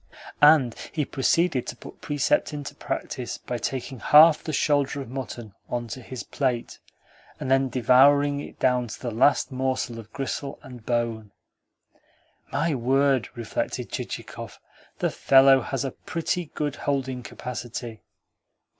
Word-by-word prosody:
And 145 -5 +6 0.2
he 150 -3 -1
proceeded 140 0 +1
to - - -5
put - - -13
precept 150 - 0
into 145 -1 -6
practice 130 -3 -4
by 120 - -5
taking 130 +2 -4
half 155 +6 +7
the 155 - -3
shoulder 145 -1 +1
of 130 -3 -7
mutton 120 -5 -6 0.2
on 120 -1 -3
to 130 - -6
his 125 +1 -7
plate, 125 -4 -2 0.6
and 130 - -3
then 135 0 +3
devouring 140 +4 +4
it - - -9
down 125 -1 +1
to 105 - -8
the 120 - -4
last 125 +6 +3
morsel 130 -2 -2
of 110 0 -12
gristle 140 +1 -4
and 125 -3 -11
bone. 115 -2 -2 1.2
"My 165 -1 0
word!" 135 -1 +2
reflected 115 -2 -4
Chichikov. - - -6 0.4
"The - - 0
fellow 135 0 +6
has 135 +2 -3
a 135 - -2
pretty 170 +4 -3
good 145 -2 -2
holding 130 -3 -2
capacity!" 120 -1 -7
130 Hz, 140 wpm, -25 LUFS, 120-145 Hz, 1.2 s, half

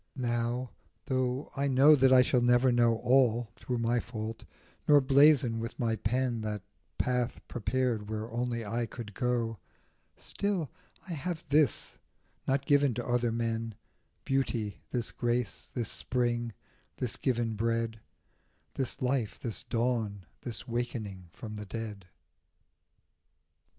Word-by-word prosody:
Now, 120 0 -1 0.3
though 130 +1 -1
I 140 0 +1
know 140 +3 +7
that 130 -1 +4
I 130 -1 +8
shall 125 0 +2
never 120 +1 +4
know 120 -1 +4
All, 120 -3 +4
through 125 - -3
my 120 +1 +2
fault, 110 -1 -5 0.4
nor 145 -1 +8
blazon 135 -3 +5
with 115 +2 -5
my 115 -4 +1
pen 120 +1 0
That 105 -2 -3 0.3
path 125 -1 0
prepared 120 -3 -1
where 110 0 -3
only 120 -1 -2
I 115 +3 -1
could 110 -2 -8
go, 115 -2 -1 0.6
Still, 195 -7 -2 0.4
I 175 - -3
have 165 +2 -3
this, 145 -4 +2 0.5
not 135 +1 +1
given 145 -4 +4
to 120 - -3
other 120 -1 +2
men: 115 -1 -2 0.5
Beauty, 120 -6 -1
this 120 -2 -2
grace, 120 -2 -2
this 120 -4 -1
spring, 120 -1 -1 0.5
this 125 -3 -2
given 120 -4 0
bread, 115 0 -1 0.7
This 130 -1 -3
life, 125 -4 0
this 115 -3 -3
dawn, 115 -5 -1 0.2
this 120 0 -4
wakening 115 -6 -3
from 110 +3 -8
the 105 - -6
dead. 105 -4 -6
120 Hz, 130 wpm, -30 LUFS, 115-130 Hz, 0.7 s, I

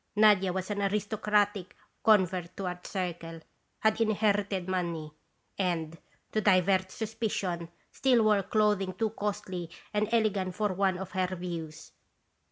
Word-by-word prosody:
Nadia 205 -3 +5
was 185 +2 -3
an 205 0 -1
aristocratic 205 -1 0 0.3
convert 185 -5 +3
to 195 - -3
our 180 0 -3
Circle, 170 -3 -4 0.4
had 220 +1 +2
inherited 205 -3 +1
money, 170 -4 -2 0.5
and, 165 -4 -1 0.4
to 215 - +1
divert 185 -1 +3
suspicion, 205 -7 -3 0.2
still 250 -4 +3
wore 210 -2 +4
clothing 200 -2 +1
too 220 +1 0
costly 190 -5 -4 0.2
and 210 +1 0
ele 220 -2 +3
gant 185 -2 -3
for 210 -3 0
one 190 0 +1
of 190 0 -6
her 185 -1 -1
views. 165 -3 -6
195 Hz, 135 wpm, -29 LUFS, 180-210 Hz, 0.5 s, Nadia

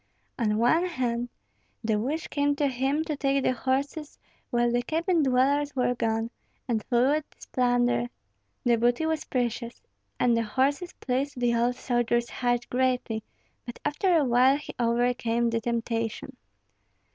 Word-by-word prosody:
On 210 -2 +1
one 285 +10 +3
hand 245 -6 -2 0.5
the 220 -1 +1
wish 295 +8 -2
came 285 0 +1
to 290 - 0
him 270 +3 0
to 310 -2 -3
take 275 -1 +1
the - - +2
horses 275 +5 -2 0.3
while 240 0 +2
the 240 0 +2
cabin 330 +6 +1
dwellers 280 +2 +2
were 250 -1 +2
gone, 225 -1 -1 0.4
and 225 -4 0
flee 240 -1 +2
with 310 - -7
this - - -15
plunder. 245 -1 +1 0.6
The 240 -1 +3
booty 240 +6 +2
was 320 -1 -1
precious, 240 -1 -2 0.4
and 240 -1 +3
the 230 - +2
horses 275 +9 0
pleased 265 +1 -2
the 240 -1 +2
old 240 +1 +1
soldier's 240 -1 0
heart 245 -1 0
greatly; 250 -3 0 0.4
but 240 -1 -8
after 335 +4 +2
a 300 - +3
while 255 +3 +4
he 295 - -8
overcame 235 0 +1
the 230 0 0
temptation. 230 -1 -2
245 Hz, 155 wpm, -27 LUFS, 235-280 Hz, 0.6 s, while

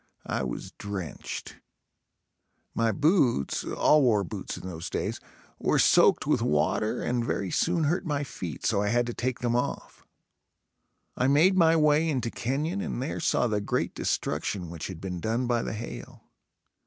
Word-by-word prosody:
I - - -2
was 65 -2 -5
drenched. 100 -5 -6 1.2
My 115 -1 +2
boots, 145 - +2
all 150 - +3
wore 110 -6 +3
boots 85 - -6
in - - -8
those 85 -2 -6
days, - - -3 0.4
were - - +2
soaked - - +5
with - - +2
water 75 +8 +1
and 120 -1 0
very 100 -5 -2
soon 170 -1 +1
hurt 165 +6 +1
my 145 -4 -1
feet 90 - -6
so 100 - +2
I 105 - 0
had 120 +3 +2
to 120 - -4
take 125 +1 -3
them 120 -1 0
off. 125 - -3 1.1
I 125 - +1
made 160 +8 +5
my 165 -3 +5
way 155 +1 +3
into 125 -6 -1
Kenyon 150 +10 -2
and 215 - -3
there 135 +4 -3
saw - - +2
the 105 -3 0
great 100 - -1
destruction 90 -5 -2
which 85 -2 -5
had 90 -4 -8
been 90 -2 -4
done 115 +7 -1
by 120 -1 +1
the - - -4
hail. 110 +2 -8
120 Hz, 165 wpm, -27 LUFS, 100-150 Hz, 1.2 s, soaked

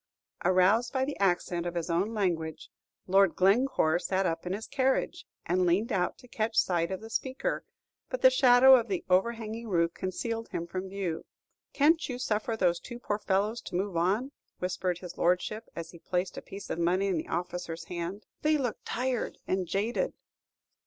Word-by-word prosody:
Aroused 185 +6 +4
by 265 -1 +1
the 285 - -4
accent 175 -2 +1
of 175 - -4
his 170 -2 -2
own 180 +5 0
language, 170 -7 -2 0.3
Lord 195 -1 +4
Glencore 195 -4 +3
sat 190 +1 0
up 165 0 -2
in 180 - -1
his 215 +3 -4
carriage, 265 -1 0 0.2
and 180 +1 +2
leaned 195 +7 +2
out 180 -3 0
to 250 - -16
catch 220 -1 -2
sight 170 -2 +2
of 190 +1 -4
the 225 - -9
speaker; 265 - -2 0.5
but - - -4
the - - +9
shadow 260 - +7
of 235 -2 +2
the 190 -4 -2
overhanging 225 +3 0
roof 170 -4 +1
concealed 225 +5 -3
him 170 - -3
from 185 +2 -5
view. 190 -4 -3 0.5
"Can't 315 +2 +3
you 250 - -3
suffer 225 -2 -1
those 175 -4 +2
two 240 - -8
poor 210 -3 -2
fellows 210 +4 0
to - - -7
move 190 0 -1
on?" 200 +11 +1 0.3
whispered 180 -1 -1
his 180 0 -9
Lordship, 180 +6 0
as 170 -1 -6
he 170 - -13
placed 180 +2 -2
a - - -6
piece 200 +1 -8
of - - -2
money 180 +3 +2
in 190 -3 +1
the - - -6
officer's 175 -1 -4
hand; 175 +4 -5 0.2
"they 305 0 +3
look 250 -5 -2
tired 250 0 -2
and 185 -1 -1
jaded." 220 - -1
195 Hz, 185 wpm, -29 LUFS, 175-235 Hz, 0.5 s, the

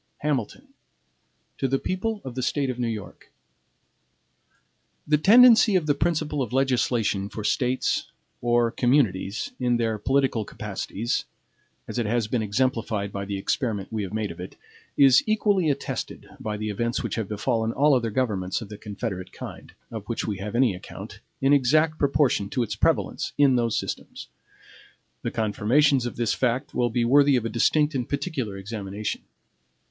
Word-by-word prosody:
HAMILTON 150 - -2 0.9
To 135 - +1
the 135 +1 +1
People 205 +7 -3
of 130 - -5
the 130 - -3
State 135 +1 0
of 125 - -8
New 120 - 0
York: 110 -3 -7 1.7
THE 150 0 +2
tendency 225 +2 +7
of 175 -4 +2
the 145 - +3
principle 150 -1 -1
of 125 - -3
legislation 120 -6 +1
for 105 - -6
States, 125 +4 0 0.3
or 120 -1 +2
communities, 115 -7 +1
in 120 -1 +2
their 110 -2 -1
political 135 -1 +1
capacities, 105 +2 -3 0.6
as - - -3
it 115 - 0
has 115 0 0
been 115 +1 -1
exemplified 110 -2 -1
by 100 0 -4
the 100 0 -3
experiment 105 -1 -2
we 110 - -1
have 95 - -5
made 110 -2 -2
of 85 - -11
it, 90 - -8 0.4
is 135 -2 +7
equally 205 -6 +2
attested 140 -1 -4
by 105 -1 -4
the 110 0 -3
events 115 +3 -2
which - - -3
have 110 -4 -3
befallen 110 +1 0
all 145 +4 +3
other 120 -3 +1
governments 105 -6 -1
of 110 - -9
the 105 - -9
confederate 100 -3 -5
kind, - - -9 0.2
of 110 -2 -7
which 115 - -2
we 100 -3 -3
have 105 +3 -5
any 120 -4 +3
account, 90 - -10 0.2
in 135 +1 +4
exact 155 +4 +3
proportion 140 -8 +2
to 125 - 0
its 115 - -4
prevalence - - 0
in 140 -3 +5
those 115 -2 +1
systems. - - -5 0.9
The - - -2
confirmations 120 +5 +2
of 120 - -6
this 120 -2 0
fact 125 0 -1
will 120 -1 +1
be 120 +1 0
worthy 140 +2 +5
of 120 -3 0
a - - -1
distinct 150 +7 +2
and 125 -3 -3
particular 140 - -3
examination. 100 0 -5
120 Hz, 165 wpm, -25 LUFS, 105-140 Hz, 1.7 s, tendency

